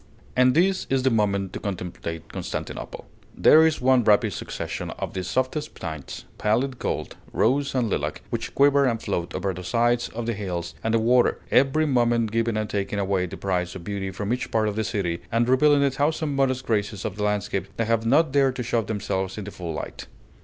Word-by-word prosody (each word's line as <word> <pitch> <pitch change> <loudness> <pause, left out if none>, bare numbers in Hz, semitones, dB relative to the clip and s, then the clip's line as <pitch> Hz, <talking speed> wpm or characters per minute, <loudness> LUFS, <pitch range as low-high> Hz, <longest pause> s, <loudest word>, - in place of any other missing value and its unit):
And 125 0 +4
this 190 +3 +2
is 135 -1 +1
the 130 - +3
moment 100 -3 +1
to - - -4
contemplate 90 -4 -5
Constantinople. - - -5 0.3
There 160 +1 +7
is 160 - -1
one 130 -1 +4
rapid 105 -1 +3
succession - - -5
of - - -4
the 95 - -3
softest 130 - -2
tints, 80 -5 -7
pallid 120 +5 0
gold, - - -3
rose 140 +4 +1
and 125 -3 +2
lilac, 105 - -2
which - - -4
quiver 140 0 +5
and 115 -3 +1
float 85 -5 -3
over 95 +1 -1
the 90 +1 -7
sides 120 +5 +1
of 115 0 -5
the 115 - -1
hills 90 -5 -4
and 110 0 +1
the - - +4
water, 120 +2 +3
every 140 +4 +4
moment 120 -5 +2
giving 115 0 0
and 110 0 -1
taking 100 0 -2
away 95 -2 0
the - - -8
prize 90 -2 -2
of 90 - -8
beauty 100 0 -3
from 100 +4 -2
each 125 - -3
part 110 -1 +1
of 105 - -2
the 110 - 0
city, 95 -6 -2
and 115 +1 +2
revealing 140 +3 +4
a 140 - +3
thousand 145 +1 0
modest 130 -1 +1
graces 105 -2 -1
of 105 -3 -3
the 105 - -2
landscape 105 -2 -1
that 115 - +1
have 115 0 +1
not 145 +6 +3
dared 135 -2 +3
to 125 - -3
show 115 0 +1
themselves 95 -2 -3
in 105 - -4
the 105 - -7
full 85 -3 -6
light. - - -6
115 Hz, 210 wpm, -25 LUFS, 100-130 Hz, 0.3 s, There